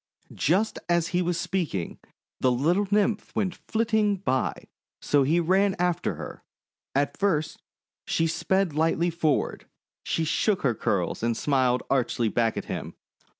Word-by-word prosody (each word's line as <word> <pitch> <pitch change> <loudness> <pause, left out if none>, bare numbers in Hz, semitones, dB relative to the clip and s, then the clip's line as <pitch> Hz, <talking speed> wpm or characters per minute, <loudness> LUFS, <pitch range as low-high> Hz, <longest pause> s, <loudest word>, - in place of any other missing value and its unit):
Just 195 +8 +1
as 170 -1 +2
he 180 0 +1
was 175 -1 -1
speaking, 160 - -2 0.4
the 130 - +3
little 170 +11 +2
Nymph 205 0 0
went 185 -3 0
flitting 220 -1 0
by, 130 -9 -1 0.3
so 145 - +2
he 155 +6 +3
ran 190 +3 +2
after 175 -1 0
her. - - -8 0.5
At 140 +1 0
first, 165 -7 0
as - - -35 0.5
she 165 - +2
sped 190 +1 0
lightly 165 +3 +1
forward, 160 -3 -1 0.4
she 165 - -1
shook 195 +5 +1
her 125 -4 +3
curls 100 -4 -1
and 115 0 0
smiled 130 -3 +1
archly 125 -3 +1
back 115 0 0
at - - -3
him. - - -5
165 Hz, 150 wpm, -26 LUFS, 135-190 Hz, 0.5 s, the